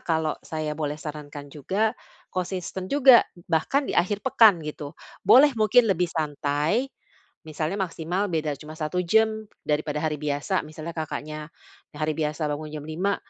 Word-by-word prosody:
kalau 160 -2 0
saya 155 -1 -4
boleh 150 -1 -3
sarankan 145 -1 -8
juga, 200 - 0 0.4
konsisten 185 0 -4
juga, 265 -2 +7 0.3
bahkan 270 - +2
di - - -3
akhir 200 +5 +1
pekan, 225 -7 +6
gitu. 150 -1 -7 0.2
Boleh 285 +3 +7
mungkin 225 +2 +4
lebih 180 0 0
santai, 155 - -1 0.6
misalnya 155 +6 -3
maksimal 180 +2 -2
beda 155 -3 -1
cuma 155 +2 -10
1 160 +3 -2
jam 220 +4 +2 0.2
daripada 150 0 -1
hari 150 -2 -1
biasa. 145 -1 -1
Misalnya 155 +2 -7
Kakaknya, 155 -1 -5 0.5
yang 145 - -9
hari 155 - +1
biasa 150 0 -2
bangun 155 +1 -4
jam 150 - -6
5.00, 175 +6 -1
160 Hz, 150 wpm, -25 LUFS, 150-195 Hz, 0.6 s, juga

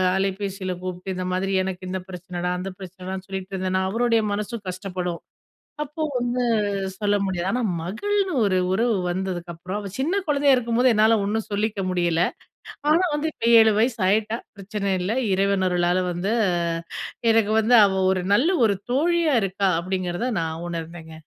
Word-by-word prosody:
அலைபேசியில 195 -1 -2
கூப்ட்டு, 185 +1 -5
இந்த 185 0 -3
மாதிரி 195 +1 -1
எனக்கு 185 -1 -5
இந்த 190 0 -2
பிரச்சனடா, 180 -1 -4
அந்த 190 +1 -4
பிரச்சனடான்னு 185 0 -7
சொல்லிட்டுருந்தேனா, 190 -1 -2
அவருடைய 230 0 +2
மனசும் 210 +1 -4
கஷ்டப்படும். 180 -2 -4 0.6
அப்போ 300 +2 -8 0.2
வந்து 245 +1 -1 0.6
சொல்ல 205 0 +1
முடியாது, 185 -2 -2
ஆனா 250 - 0 0.2
மகள்னு 385 - -1
ஒரு 185 -2 +2
உறவு 225 +2 +2
வந்ததுக்கப்புறம் 180 0 -4
அவ 205 - -6
சின்ன 340 +9 +1
குழந்தயா 285 -2 +4
இருக்கும்போது, 245 +1 +2
என்னால 220 +1 +4
ஒண்ணும் 220 +2 -2
சொல்லிக்க 205 0 -1
முடியல. 175 -2 +1 0.7
ஆனா 335 +4 +4
வந்து 310 +2 -1
இப்ப 230 - -5 0.2
7 220 -1 +5
வயசு 235 0 +1
ஆயிட்டா, 215 +3 +1 0.2
பிரச்சன 200 0 -2
இல்ல. 180 +3 -1 0.2
இறைவன் 195 0 +2
அருளால 175 0 +1
வந்து 180 +5 -1 1.0
எனக்கு 220 -1 +3
வந்து 230 +3 +4
அவ 195 - +1 0.2
ஒரு 185 -1 0
நல்ல 255 +10 +3 0.2
ஒரு 200 - +2 0.2
தோழியா 325 +2 +2
இருக்கா, 195 +1 0
அப்டிங்குறத 185 +5 -2
நான் 160 +1 -4
உணர்ந்தேங்க. 165 -1 -7
195 Hz, 145 wpm, -23 LUFS, 185-225 Hz, 1.0 s, 7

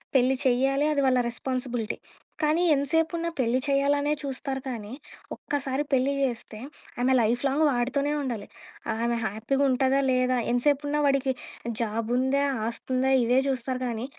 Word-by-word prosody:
పెళ్లి 260 +1 +4
చెయ్యాలి 270 +3 +2
అది 280 - +1
వాళ్ళ 255 -1 +3
రెస్పాన్సిబిలిటీ. 245 -2 -3 0.4
కానీ, 310 +3 +2
ఎంత 280 0 +1
సేపున్నా 330 +1 +1
పెళ్లి 250 +1 +2
చేయాలనే 285 +1 +2
చూస్తారు 270 -1 -4
కానీ, 225 -4 -5 0.4
ఒక్కసారి 280 0 -2
పెళ్లి 270 +1 +2
జేస్తే 235 -4 -2 0.4
ఆమె 260 +1 +3
లైఫ్‌లాంగ్ 265 +7 +1
వాడితోనే 265 +4 0
ఉండాలి. 235 -7 -4 0.5
ఆమె 235 +1 0
హ్యాపీగా 230 +7 -1
ఉంటదా? 265 +1 +2
లేదా? 255 0 +2
ఎంతసేపున్నా 290 +4 +1
వాడికి 275 -1 +2 0.5
జాబ్ 225 0 -2
ఉందా? 270 +2 +2 0.2
ఆస్తుందా? 255 +3 -1
ఇవే 245 +2 +3
జూస్తారు 255 -1 -2
కానీ, 230 +1 -3
260 Hz, 130 wpm, -26 LUFS, 245-280 Hz, 0.5 s, పెళ్లి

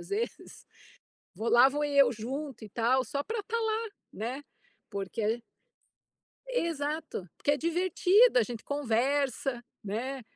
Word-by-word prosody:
às - - -11
vezes. 430 +4 -4 0.7
Vou 220 +5 -2
lá 245 +3 +7
vou 295 +2 -1
eu 280 -4 +5
junto 255 +3 -5
e - - -9
tal, 245 +5 +2
só 280 - -2
pra 450 -1 -2
estar 465 +3 -2
lá, 445 0 -1 0.2
né. 250 +7 -4 0.5
Porque 200 +2 -4
a 225 +3 +1 1.1
Exato. 310 - -2
Porque 290 - +1
é - - +2
divertido, 360 - +4
a - - +5
gente 230 +1 -6
conversa, 270 -1 0 0.2
né. 250 +6 -3
275 Hz, 140 wpm, -30 LUFS, 235-330 Hz, 1.1 s, lá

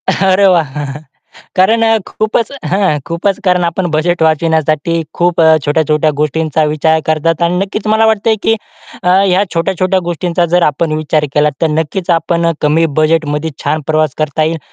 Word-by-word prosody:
अरे 195 +1 +2
वाह! 150 -6 0 0.7
कारण 215 +5 +3
अ, 225 0 +3
खूपच 215 +2 -1 0.2
हं 190 -5 +1
खूपच 175 +4 -1
कारण 180 -2 +2
आपण 170 +2 -1
बजेट 165 +2 0
वाचविण्यासाठी 160 0 +1
खूप 175 0 0
अ, 160 0 +6
छोट्या-छोट्या 155 +1 +1
गोष्टींचा 155 +1 0
विचार 160 +1 +1
करतात. 160 +1 0
आणि 170 +1 +1
नक्कीच 195 +3 -3
मला 220 +1 +3
वाटतंय 220 0 +2
की 225 - +3 0.5
अ, - - -2
ह्या 190 +1 +3
छोट्या-छोट्या 185 +2 0
गोष्टींचा 175 0 -1
जर 175 +1 +1
आपण 155 +2 0
विचार 155 0 0
केला, 150 0 +3
तर 165 - +3
नक्कीच 160 +4 -2
आपण 170 0 0
कमी 155 +2 +2
बजेटमध्ये 155 -1 0
छान 155 +2 -1
प्रवास 155 -2 +1
करता 155 0 -1
येईल. 160 +1 -1
165 Hz, 160 wpm, -13 LUFS, 155-185 Hz, 0.7 s, अ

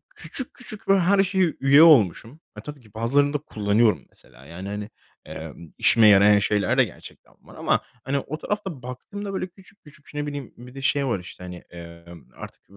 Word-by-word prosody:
küçük 260 - -6
küçük 215 -4 -10
böyle 195 0 +4
her 195 +3 +4
şeye 185 -3 0
üye 140 +3 +7
olmuşum. 130 - +4 0.2
E, - - -7
tabii 150 -2 -10
ki 110 -3 -21
bazılarını 140 +6 +1
da 150 - +1
kullanıyorum. 110 -4 +1
Mesela, 65 - -18
yani, 90 +6 -8
hani, 105 +1 -5 0.4
eee, - - -8 0.2
işime 115 -2 +5
yarayan 105 0 +6
şeyler 100 0 0
de - - +7
gerçekten - - -14
var - - -17
ama - - 0 0.2
hani, 135 +2 -1
o 155 +3 -6
tarafta 190 -9 -4
baktığımda 195 - -7
böyle 190 - -3
küçük 190 +2 -21
küçük 150 -1 -18
şey, 150 - -5
ne 145 - -4
bileyim. 145 -3 -7
Bir 125 +1 -13
de 135 - -7
şey 140 0 +1
var, 115 -6 -1
işte, 90 0 -12
hani, 90 -1 -9
eee, 85 -1 -11 0.3
artık - - -11
135 Hz, 195 wpm, -24 LUFS, 105-165 Hz, 0.4 s, üye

